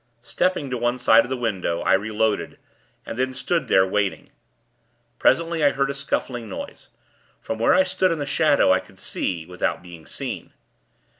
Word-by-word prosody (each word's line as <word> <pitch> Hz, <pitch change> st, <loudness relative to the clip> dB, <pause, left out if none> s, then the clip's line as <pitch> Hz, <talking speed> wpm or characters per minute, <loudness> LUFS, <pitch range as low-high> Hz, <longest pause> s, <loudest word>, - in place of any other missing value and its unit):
Stepping 175 Hz, -3 st, -1 dB
to 125 Hz, -, -2 dB
one 120 Hz, +1 st, 0 dB
side 115 Hz, -2 st, +5 dB
of -, -, -9 dB
the 130 Hz, -, -2 dB
window, 95 Hz, -8 st, -2 dB
I -, -, +2 dB
reloaded, 110 Hz, +2 st, 0 dB, 0.5 s
and 115 Hz, -, -6 dB
then 130 Hz, 0 st, -1 dB
stood 155 Hz, +1 st, -1 dB
there, 95 Hz, -3 st, +5 dB
waiting. 100 Hz, 0 st, -2 dB, 0.9 s
Presently, 165 Hz, +3 st, +2 dB
I 145 Hz, -, +6 dB
heard 135 Hz, 0 st, 0 dB
a -, -, -4 dB
scuffling 125 Hz, -4 st, -3 dB
noise. -, -, -8 dB, 0.5 s
From 110 Hz, -, -5 dB
where 115 Hz, -, +4 dB
I 185 Hz, -, +5 dB
stood 185 Hz, 0 st, +1 dB
in 165 Hz, -, -1 dB
the 145 Hz, -, -3 dB
shadow, 145 Hz, -, +3 dB
I 95 Hz, -, +4 dB
could 95 Hz, -, -17 dB
see, 85 Hz, -3 st, -3 dB
without 90 Hz, 0 st, -2 dB
being 85 Hz, -3 st, -12 dB
seen. -, -, -5 dB
120 Hz, 175 wpm, -23 LUFS, 95-140 Hz, 0.9 s, I